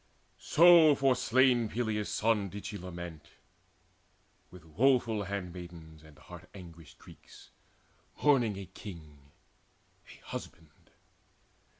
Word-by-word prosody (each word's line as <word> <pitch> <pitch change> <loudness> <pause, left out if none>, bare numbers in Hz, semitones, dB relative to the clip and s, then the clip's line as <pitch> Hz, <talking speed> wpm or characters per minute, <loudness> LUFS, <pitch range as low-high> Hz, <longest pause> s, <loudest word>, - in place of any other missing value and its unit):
So 165 -2 +6
for 135 -1 +2
slain 125 -2 +2
Peleus' 110 -3 -3
son 105 -3 0
did 100 +2 -9
she - - -6
lament 85 -4 -9 1.2
With 90 -2 -15
woeful 115 - +1
handmaids 85 -4 -8
and 75 -2 -18
heart - - -14
anguished 85 -5 -13
Greeks, - - -17 0.7
Mourning 125 -9 +3
a 100 - -7
king, 75 -9 -13 0.8
a - - -17
husband. 80 -2 -10
100 Hz, 100 wpm, -30 LUFS, 85-120 Hz, 1.2 s, So